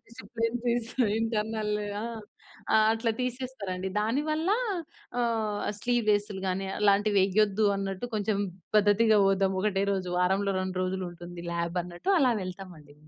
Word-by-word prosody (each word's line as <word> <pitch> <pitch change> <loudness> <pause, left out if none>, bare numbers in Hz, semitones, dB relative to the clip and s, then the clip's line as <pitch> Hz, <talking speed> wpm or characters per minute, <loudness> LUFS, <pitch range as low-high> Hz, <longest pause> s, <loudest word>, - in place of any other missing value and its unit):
Discipline 230 -1 -3
చేసి 235 -1 0
ఇంక 225 -5 +3
ఇంటర్నల్‌ని 215 -2 -1 0.9
ఆ! - - +7 0.2
అట్లా 225 +1 0
తీసేస్తారండి. 245 -7 -3
దాని 230 +7 +1
వల్లా 320 +7 +1 0.6
ఆహ్, 220 -3 0 0.2
స్లీవ్‌లె‌స్లు 210 -4 +1
గాని 190 +1 -1
అలాంటివి 205 0 +3
వేయొద్దు 205 +2 +2
అన్నట్టు 195 +3 -3
కొంచెం 210 -1 0 0.4
పద్ధతిగా 210 +1 +5
పోదాం. 195 0 +2
ఒకటే 195 -1 +1
రోజు 185 -2 -2
వారంలో 195 +2 +2
2 185 0 -3
రోజులు 185 0 -2
ఉంటుంది 175 0 -9
లాబ్ 170 +1 -2
అన్నట్టు 175 - -4
అలా 255 -4 +4
వెళ్తాం 185 0 -7
అండి. 145 -1 -17
210 Hz, 135 wpm, -28 LUFS, 190-230 Hz, 0.9 s, ఆ